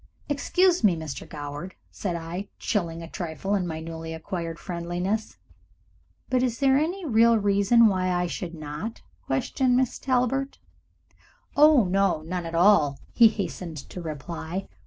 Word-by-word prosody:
"Excuse 350 Hz, +4 st, +2 dB
me, 195 Hz, -5 st, +5 dB
Mr. 160 Hz, -3 st, -7 dB
Goward," 145 Hz, +4 st, -7 dB, 0.2 s
said 180 Hz, -4 st, -3 dB
I, 170 Hz, +4 st, -5 dB
chilling 170 Hz, -5 st, -2 dB
a -, -, -7 dB
trifle 175 Hz, +3 st, -4 dB
in 190 Hz, -3 st, 0 dB
my 160 Hz, -1 st, -4 dB
newly 160 Hz, 0 st, -6 dB
acquired 165 Hz, 0 st, -5 dB
friendliness, 180 Hz, +5 st, -3 dB, 0.9 s
"but 255 Hz, -1 st, +1 dB
is 245 Hz, -2 st, 0 dB
there 270 Hz, 0 st, +4 dB
any 340 Hz, +6 st, 0 dB
real 230 Hz, -3 st, +5 dB
reason 205 Hz, +3 st, +4 dB
why 185 Hz, -3 st, +2 dB
I 180 Hz, 0 st, +1 dB
should 170 Hz, 0 st, -5 dB
not 155 Hz, +8 st, -6 dB, 0.2 s
question 245 Hz, -, 0 dB
Miss 255 Hz, -1 st, +1 dB
Talbert 265 Hz, +1 st, 0 dB, 0.5 s
" -, -, -31 dB, 0.2 s
"Oh 300 Hz, -3 st, +7 dB
no, 190 Hz, -4 st, +1 dB
none 175 Hz, +1 st, -4 dB
at 165 Hz, -, -5 dB
all," 165 Hz, -6 st, +4 dB, 0.2 s
he 235 Hz, -, +8 dB
hastened 180 Hz, -6 st, -4 dB
to 180 Hz, -, -6 dB
reply. 165 Hz, +3 st, -5 dB
185 Hz, 150 wpm, -26 LUFS, 165-230 Hz, 0.9 s, he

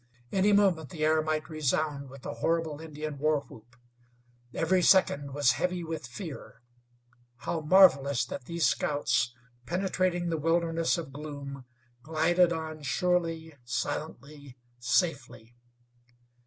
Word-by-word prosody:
Any 195 Hz, +2 st, +3 dB
movement 190 Hz, -8 st, +3 dB
the 155 Hz, +1 st, -2 dB
air 155 Hz, 0 st, +3 dB
might 155 Hz, 0 st, -2 dB
resound 150 Hz, -2 st, -1 dB
with 135 Hz, -1 st, -13 dB
the -, -, -5 dB
horrible 160 Hz, +4 st, -1 dB
Indian 155 Hz, -2 st, -6 dB
war 155 Hz, 0 st, +2 dB
whoop. 120 Hz, -2 st, -16 dB, 0.8 s
Every 180 Hz, +6 st, +1 dB
second 145 Hz, -7 st, +3 dB
was 145 Hz, -3 st, +4 dB
heavy 180 Hz, -1 st, -1 dB
with 160 Hz, -6 st, -5 dB
fear. 145 Hz, -, -9 dB, 0.7 s
How 160 Hz, +6 st, -3 dB
marvelous 140 Hz, -7 st, +5 dB
that 125 Hz, +1 st, -7 dB
these 170 Hz, +1 st, -1 dB
scouts, 140 Hz, -3 st, +1 dB, 0.3 s
penetrating 180 Hz, -1 st, 0 dB
the 165 Hz, -2 st, -1 dB
wilderness 165 Hz, +1 st, +1 dB
of 155 Hz, -5 st, -6 dB
gloom, 140 Hz, -2 st, -7 dB, 0.4 s
glided 165 Hz, +4 st, +2 dB
on 160 Hz, -1 st, -4 dB
surely, 165 Hz, +1 st, -1 dB
silently, 140 Hz, +2 st, -5 dB, 0.2 s
safely! 120 Hz, -, -1 dB
155 Hz, 120 wpm, -29 LUFS, 140-170 Hz, 0.8 s, marvelous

